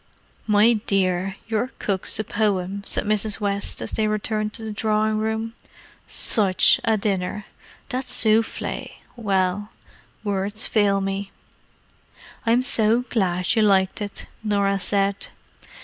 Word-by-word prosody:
"My 215 +2 +5
dear, 190 -1 +1
your 230 +3 -1
cook's 195 -3 -1
a 215 - -1
poem," 200 -2 -1
said - - +1
Mrs. 215 0 -1
West, 200 -1 -2
as - - -5
they 215 -1 0
returned 215 0 -1
to 225 - -4
the 220 - -4
drawing 215 0 +1
room. 220 +1 -2 0.5
"Such 195 -4 +3
a 220 -1 +2
dinner! 195 0 -2 0.4
That 260 0 -2
souffle—well, 210 -3 0 0.5
words 205 +2 0
fail 200 -2 +2
me!" 195 +1 -3 1.2
"I'm 240 +2 +4
so 230 -2 +2
glad 185 -3 +1
you 220 - +3
liked 195 -1 +3
it," 205 -1 -5 0.2
Norah 200 -2 +1
said. 200 +1 0
210 Hz, 120 wpm, -23 LUFS, 195-220 Hz, 1.2 s, My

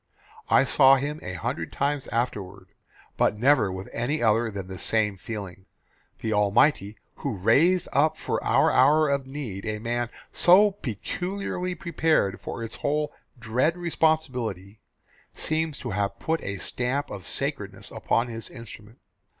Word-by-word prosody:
I - - +5
saw 135 0 +6
him 145 +3 -3
a 95 - -6
hundred 80 - -4
times 140 0 -1
afterward 100 -5 -3 0.5
but 105 - +2
never 120 -4 +3
with 95 +1 -6
any 145 +6 -1
other 115 +1 +3
than 100 -3 -6
the 95 -1 -8
same 105 -2 +1
feeling. 95 -1 -8 0.5
The 110 - -1
Almighty, 105 +1 +2 0.2
who - - -3
raised 155 - +3
up 155 +3 +3
for - - -2
our - - +3
hour 150 +3 +5
of 140 -1 -1
need 130 -9 -6
a 110 0 -2
man 120 +2 -2 0.2
so 200 +4 +6
peculiarly 180 - -4
prepared 160 - 0
for 115 - -5
its 115 - -6
whole 150 +1 -1 0.2
dread 125 +9 0
responsibility, 125 - -1 0.6
seems 155 -1 -1
to 120 - -5
have 100 +1 -1
put 160 0 -1
a 100 0 -4
stamp 125 +8 -2
of 100 -3 -7
sacredness - - -3
upon 115 - 0
his 115 -1 -6
instrument. 115 -2 -11
120 Hz, 145 wpm, -26 LUFS, 105-150 Hz, 0.6 s, saw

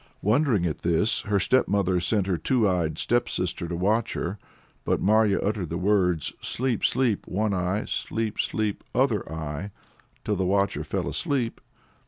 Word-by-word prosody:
Wondering 110 - +2
at 80 - -2
this, 85 +6 +1
her 100 -1 +3
stepmother 95 -5 +2
sent 100 +2 +1
her 95 -2 0
two 115 - +2
eyed 85 -4 0
stepsister 90 -8 -1
to 85 - -3
watch 105 +6 +1
her. 95 +4 -3 0.4
But - - +1
Marya 105 0 +3
uttered 100 -5 -1
the 85 - -2
words 90 -4 +1
"Sleep, 125 -3 -1
sleep, 120 -6 +1
one 105 +2 0
eye! 90 +3 -1
sleep, 110 -1 -3
sleep, 105 -2 -1
other 120 -8 +1
eye!" 80 +3 -4 0.6
till 105 -2 0
the 95 - 0
watcher 100 +2 +1
fell - - -2
asleep. 125 -5 -1
100 Hz, 155 wpm, -26 LUFS, 90-110 Hz, 0.6 s, her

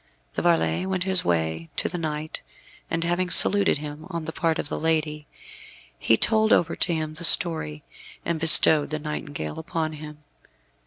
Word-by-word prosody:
The - - -4
varlet 170 - 0
went 185 -1 -2
his 190 -1 +1
way 80 -1 -3
to - - -2
the 180 - -6
knight, 155 -1 -6 0.5
and 165 0 -3
having 175 +1 -2
saluted 200 +2 +5
him 150 +2 -10
on 170 -3 -6
the 160 - -6
part 165 -1 -2
of - - -5
the - - -6
lady, 155 -2 -3 0.7
he 115 - +1
told 220 - +1
over 170 - +1
to 180 - -2
him 155 -1 -5
the 160 +2 -8
story, 160 - +3 0.4
and 170 -1 -3
bestowed 155 -1 +6
the 155 - -4
nightingale 150 - -7
upon 160 -1 -5
him. 150 0 -12
155 Hz, 170 wpm, -23 LUFS, 150-170 Hz, 0.7 s, bestowed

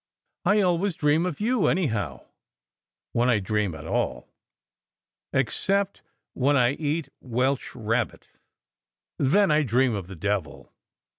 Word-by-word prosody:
"I 210 +1 +4
always 180 0 +1
dream 155 +4 +2
of 175 - -5
you 220 -5 +2
any 180 +1 +2
how, 100 - -3 0.9
when 120 +2 +2
I 120 - +4
dream 105 -3 -1
at 70 - -9
all - - -2 1.0
except 195 - 0 0.3
when 140 +2 +2
I 125 -1 +4
eat 150 0 -2
welsh 130 +2 -1
rabbit: 115 0 -2 0.9
then 180 +7 +4
I 150 +1 +4
dream 125 -1 +2
of 100 -4 -4
the 95 - -9
devil." 80 -7 -3
130 Hz, 130 wpm, -26 LUFS, 105-165 Hz, 1.0 s, I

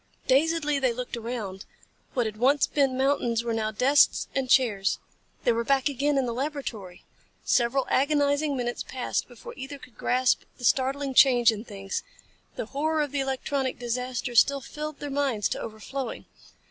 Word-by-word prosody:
Dazedly 295 +1 +2
they 260 -3 +1
looked 250 +1 -5
around. 225 -5 -5 0.5
What 245 -3 +1
had 215 -1 -4
once 270 +5 +4
been 270 -3 +1
mountains 255 -4 +1
were 235 -1 -2
now 220 -1 -1
desks 265 +7 +3
and 265 -2 -1
chairs. 215 -8 +3 0.5
They 240 - +4
were 230 0 0
back 275 +2 +2
again 285 +1 0
in 270 - +2
the 235 - -2
laboratory. 245 -9 -5 0.4
Several 250 +2 +2
agonizing 285 +1 +2
minutes 240 -1 -2
passed 255 -1 -3
before 245 -2 -11
either 275 +2 -7
could 250 -5 -16
grasp 255 0 +2 0.2
the 245 - -13
startling 270 +2 +1
change 245 -3 +6
in 215 -1 -6
things. 195 -3 -5 0.5
The - - -4
horror 310 +2 +1
of 290 - -5
the 285 - -1
electronic 270 0 -2
disaster 245 +1 -3
still 280 +4 +5
filled 300 +2 -6
their 290 -1 -6
minds 270 -7 0
to - - -3
overflowing. 235 +4 -6
260 Hz, 165 wpm, -26 LUFS, 235-280 Hz, 0.5 s, change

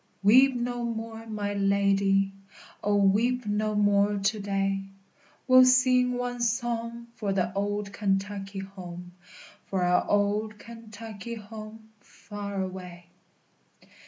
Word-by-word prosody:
CHORUS. 205 +2 +6
_Weep 265 0 +6
no 245 0 -2
more, 225 -1 -5
my 205 -2 -3
lady; 195 0 +2 0.5
O, 205 0 +2
weep 220 +5 +2
no 210 +1 -1
more 205 0 +3
to 200 +2 0
day! 195 -1 -1 0.7
We'll 255 0 +8
sing 255 0 +4
one 245 0 -3
song 235 0 -2
for 210 -4 -2
the 190 -1 0
old 205 0 -2
Kentucky 195 0 -2
home, 180 -2 -8 0.6
For 190 -2 -1
our 180 0 +3
old 210 +1 +1
Kentucky 225 -1 -9
home 220 0 -10
far 200 -2 -6
away. 180 -2 -8
205 Hz, 120 wpm, -27 LUFS, 195-230 Hz, 0.7 s, We'll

